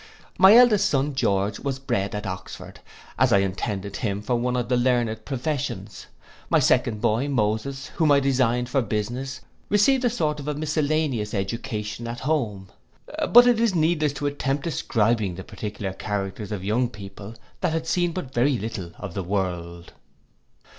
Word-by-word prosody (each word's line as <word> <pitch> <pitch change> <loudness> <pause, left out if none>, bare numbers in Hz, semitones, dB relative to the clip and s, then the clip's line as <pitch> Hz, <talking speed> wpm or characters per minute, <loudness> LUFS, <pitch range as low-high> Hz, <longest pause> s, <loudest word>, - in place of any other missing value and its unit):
My 195 +3 +9
eldest 220 -5 +5
son 140 +1 0
George 100 -5 0
was 135 -2 -3
bred 100 -7 -2
at 105 +1 -4
Oxford, 95 -1 -7 0.4
as - - +4
I - - +6
intended 100 +1 -2
him 105 -3 -2
for 125 - -1
one 125 +1 0
of 120 -2 -1
the 125 - +1
learned 120 -3 +1
professions. 145 +1 -4 0.4
My - - +4
second 110 -3 +2
boy 115 +6 +1
Moses, 130 +2 -1
whom 160 -3 +3
I 140 - +6
designed 125 -3 +1
for 135 +1 +1
business, 120 +5 -3 0.3
received 250 +6 +3
a 245 - +3
sort 155 -10 -1
of 145 - -7
a 150 - -1
miscellaneous 150 -7 -1
education 105 +2 -4
at 120 +1 -6
home. 110 -10 -1 0.6
But 245 +1 +9
it 245 -2 +4
is 230 -5 +2
needless 155 -3 +2
to 145 - -5
attempt 140 -1 -1
describing 110 - 0
the 95 - -7
particular 100 -2 -5
characters 100 +1 -4
of 100 -3 -4
young 115 +5 +1
people 100 0 -10 0.2
that 180 -4 0
had 160 0 -2
seen 175 +1 +1
but 160 -7 -6
very 130 +2 +2
little 100 -6 -5
of - - -7
the 95 - -3
world. 85 -3 -3
120 Hz, 165 wpm, -24 LUFS, 105-145 Hz, 0.6 s, My